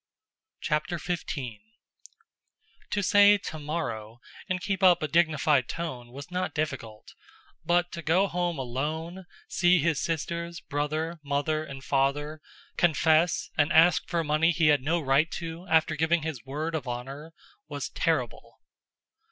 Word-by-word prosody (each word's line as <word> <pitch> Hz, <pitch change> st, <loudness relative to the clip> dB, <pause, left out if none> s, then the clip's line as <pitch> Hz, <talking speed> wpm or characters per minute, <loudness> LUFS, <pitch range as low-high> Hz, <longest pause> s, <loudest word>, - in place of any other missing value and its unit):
CHAPTER 150 Hz, +3 st, -1 dB
XV 175 Hz, +1 st, -4 dB, 1.6 s
To 200 Hz, -, -1 dB
say 205 Hz, +1 st, +6 dB
"tomorrow" 145 Hz, -, -5 dB, 0.3 s
and 185 Hz, 0 st, 0 dB
keep 195 Hz, +1 st, -2 dB
up 180 Hz, -3 st, +5 dB
a -, -, +1 dB
dignified 155 Hz, -5 st, +2 dB
tone 130 Hz, -8 st, -5 dB
was 140 Hz, +6 st, -10 dB
not 185 Hz, +1 st, -2 dB
difficult, 135 Hz, -9 st, -4 dB, 0.5 s
but 175 Hz, +1 st, +1 dB
to 170 Hz, -, -6 dB
go 170 Hz, +4 st, +3 dB
home 175 Hz, -3 st, -2 dB
alone, 155 Hz, +8 st, -4 dB, 0.2 s
see 180 Hz, -1 st, +3 dB
his 160 Hz, -2 st, +1 dB
sisters, 170 Hz, +1 st, -3 dB
brother, 155 Hz, +3 st, -3 dB
mother, 145 Hz, +2 st, -1 dB
and 140 Hz, -3 st, -9 dB
father, 145 Hz, +3 st, 0 dB, 0.4 s
confess 165 Hz, 0 st, +2 dB
and 145 Hz, 0 st, +2 dB
ask 165 Hz, +1 st, +5 dB
for 170 Hz, -1 st, 0 dB
money 155 Hz, +2 st, +2 dB
he 165 Hz, -2 st, +3 dB
had 145 Hz, -3 st, +4 dB
no 160 Hz, +6 st, 0 dB
right 145 Hz, +2 st, +2 dB
to 165 Hz, +2 st, -6 dB
after 160 Hz, 0 st, +3 dB
giving 160 Hz, +1 st, +1 dB
his 155 Hz, -8 st, -5 dB
word 150 Hz, +5 st, -3 dB
of 150 Hz, -5 st, -3 dB
honor, 135 Hz, +6 st, -6 dB, 0.4 s
was -, -, -5 dB
terrible. -, -, -2 dB
160 Hz, 135 wpm, -27 LUFS, 145-170 Hz, 1.6 s, say